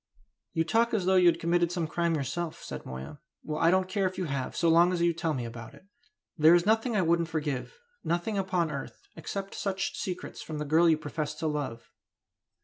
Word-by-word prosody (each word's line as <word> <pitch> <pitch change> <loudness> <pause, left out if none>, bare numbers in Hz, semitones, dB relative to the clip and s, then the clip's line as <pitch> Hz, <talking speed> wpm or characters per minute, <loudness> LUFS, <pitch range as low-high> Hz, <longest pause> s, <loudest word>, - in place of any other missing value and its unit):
"You 165 - +2
talk 230 +7 +2
as 195 -4 0
though 190 - +3
you 180 -1 +6
had 170 - +4
committed 170 0 +1
some 175 -2 -1
crime 170 +1 0
yourself," 160 +3 -3
said - - -7
Moya; 65 - -7 0.2
"well, 155 0 -3
I 165 - +5
don't 185 +1 +3
care 195 0 0
if 185 0 -6
you 185 - -1
have, 135 -4 -3
so 170 - +1
long 170 +2 +5
as 180 - -1
you 170 0 +3
tell 160 -1 -1
me 125 - -3
all 115 - -5
about 115 0 -10
it. - - -18 0.5
There 160 +1 +6
is 175 0 +2
nothing 225 +2 +2
I 195 - +3
wouldn't 170 0 +2
forgive 150 - -3 0.3
nothing 175 +6 -1
upon 185 -4 0
earth 140 -2 -7
except 195 0 -5
such 195 +8 -2
secrets 195 -11 -5
from 155 - -6
the 150 - -3
girl 160 +3 +4
you 160 - +4
profess 150 0 -4
to 160 - -5
love." 145 -7 -3
170 Hz, 225 wpm, -29 LUFS, 155-185 Hz, 0.5 s, you